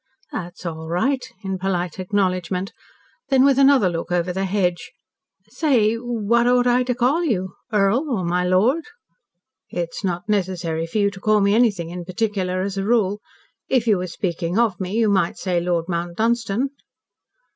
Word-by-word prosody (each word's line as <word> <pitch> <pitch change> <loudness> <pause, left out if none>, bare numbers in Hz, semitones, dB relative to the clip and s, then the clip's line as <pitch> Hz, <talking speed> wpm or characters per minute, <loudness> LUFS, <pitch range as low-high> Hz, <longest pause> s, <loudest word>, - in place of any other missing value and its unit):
"That's 175 0 -7
all 160 -1 -5
right," 255 +10 0 0.2
in 190 -1 -3
polite 180 -2 -2
acknowledgment. 185 -1 -1 0.6
Then 265 -1 +5
with 275 -1 +4
another 270 -7 +5
look 170 0 -3
over 175 0 0
the 190 +1 -1
hedge, 180 -3 -1 0.6
"Say 245 -4 +2
what 235 0 0
ought 245 0 +4
I 245 0 +3
to 250 -1 0
call 260 +8 +2
you? 190 - -1 0.2
Earl, 215 +8 +2
or 205 -9 -1
my 180 +1 +1
Lord?" 210 - +2 0.8
"It's 170 +3 -4
not 175 -2 -2
necessary 175 -5 -1
for 165 - -4
you 200 -1 +2
to 195 - -11
call 215 +1 +3
me 200 0 +3
anything 205 -8 +2
in 175 0 -6
particular 185 -1 -1
as 195 0 -3
a - - -1
rule. 210 -2 +1 0.5
If 255 -3 +2
you 210 -5 +3
were 180 - -3
speaking 170 0 -3
of 225 -6 +2
me, 190 0 -4
you 225 0 +2
might 195 -4 +1
say 180 -2 0
Lord 170 -1 0
Mount 170 -1 -3
Dunstan." 230 +2 0
195 Hz, 170 wpm, -22 LUFS, 180-235 Hz, 0.8 s, Then